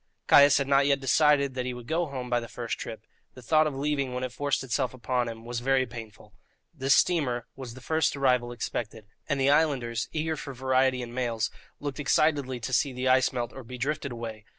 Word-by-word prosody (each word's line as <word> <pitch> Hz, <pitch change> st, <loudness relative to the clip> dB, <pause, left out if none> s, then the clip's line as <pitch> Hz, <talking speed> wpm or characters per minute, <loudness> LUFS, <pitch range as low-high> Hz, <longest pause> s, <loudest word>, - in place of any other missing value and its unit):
Caius 145 Hz, 0 st, +7 dB
had 140 Hz, -, 0 dB
not 140 Hz, 0 st, +4 dB
yet 140 Hz, -1 st, +3 dB
decided 140 Hz, 0 st, +3 dB
that 125 Hz, -1 st, -3 dB
he 125 Hz, -, -3 dB
would 120 Hz, -1 st, -9 dB
go 165 Hz, +5 st, 0 dB
home 130 Hz, -3 st, -5 dB
by 120 Hz, -1 st, +1 dB
the 115 Hz, -, -7 dB
first 120 Hz, 0 st, -5 dB
trip; 110 Hz, -1 st, -7 dB, 0.3 s
the 130 Hz, -, -11 dB
thought 155 Hz, +5 st, +3 dB
of 145 Hz, -, -4 dB
leaving, 140 Hz, -2 st, -1 dB
when 125 Hz, -, -3 dB
it 130 Hz, -, -3 dB
forced 145 Hz, +1 st, -1 dB
itself 130 Hz, +1 st, -1 dB
upon 125 Hz, -1 st, -1 dB
him, 115 Hz, 0 st, -9 dB
was 120 Hz, 0 st, -3 dB
very 130 Hz, +1 st, +2 dB
painful. 110 Hz, -3 st, -11 dB, 0.4 s
This 135 Hz, -3 st, +3 dB
steamer 130 Hz, -9 st, +1 dB
was 125 Hz, -3 st, -8 dB
the 130 Hz, -, -11 dB
first 160 Hz, +3 st, +1 dB
arrival 125 Hz, -3 st, +1 dB
expected, 115 Hz, -2 st, -5 dB, 0.2 s
and 140 Hz, -, 0 dB
the 135 Hz, +1 st, +4 dB
islanders, 130 Hz, -7 st, +1 dB
eager 160 Hz, 0 st, -1 dB
for 140 Hz, -2 st, -7 dB
variety 130 Hz, 0 st, +1 dB
and 120 Hz, 0 st, -8 dB
mails, 120 Hz, -3 st, -1 dB, 0.3 s
looked 145 Hz, 0 st, -5 dB
excitedly 145 Hz, -3 st, +1 dB
to 130 Hz, -, -4 dB
see 135 Hz, +2 st, +2 dB
the 125 Hz, +1 st, -2 dB
ice 130 Hz, 0 st, +4 dB
melt 120 Hz, -2 st, -3 dB
or 135 Hz, -, -9 dB
be 125 Hz, +2 st, -9 dB
drifted 140 Hz, +1 st, -2 dB
away. 115 Hz, -2 st, -7 dB
130 Hz, 220 wpm, -27 LUFS, 120-140 Hz, 0.4 s, Caius